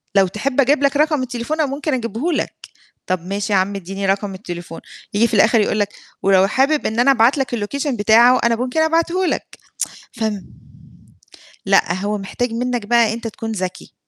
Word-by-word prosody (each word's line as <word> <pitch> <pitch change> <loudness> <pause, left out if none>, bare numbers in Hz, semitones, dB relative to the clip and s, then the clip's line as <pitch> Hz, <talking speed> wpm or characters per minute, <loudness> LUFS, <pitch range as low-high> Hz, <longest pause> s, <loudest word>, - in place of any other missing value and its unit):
"لو 195 -1 +5
تحب 255 +8 0
أجيب 280 +2 +2
لك 280 +1 +2
رقم 300 -2 +2
التليفون 255 +6 -3
أنا 285 - 0
ممكن 290 +1 -3
أجيبه 240 - -2
لك." - - -2 0.5
طَب 180 -1 -2
ماشي 200 +2 -3
يا 195 - +4
عم 200 +2 -1
إدّيني 195 +1 -5
رقم 195 0 -1
التليفون، 175 -3 -8 0.3
ييجي 230 +3 +3
في - - -3
الآخِر 215 +2 +4
يقول 210 0 0
لك: 205 - +1 0.3
"ولو 195 0 +4
حابب 275 +7 +1
إن 220 +2 -3
أنا 275 +3 +5
أبعت 255 +2 +4
لك 250 -2 -1
الLocation 280 +8 -3
بتاعه 235 +4 +5
أنا 235 -1 +3
ممكن 250 +6 -1
أبعته 335 +3 +1
لك" - - -3 0.6
فم 220 -4 -4 1.2
لأ، 195 -3 +3
هو 205 +3 -2
محتاج 225 +5 -3
منّك 245 -2 -2
بقى 230 -1 +3
أنت 230 0 -5
تكون 225 +1 -6
ذكي. 185 -3 -5
230 Hz, 185 wpm, -19 LUFS, 200-270 Hz, 1.2 s, لو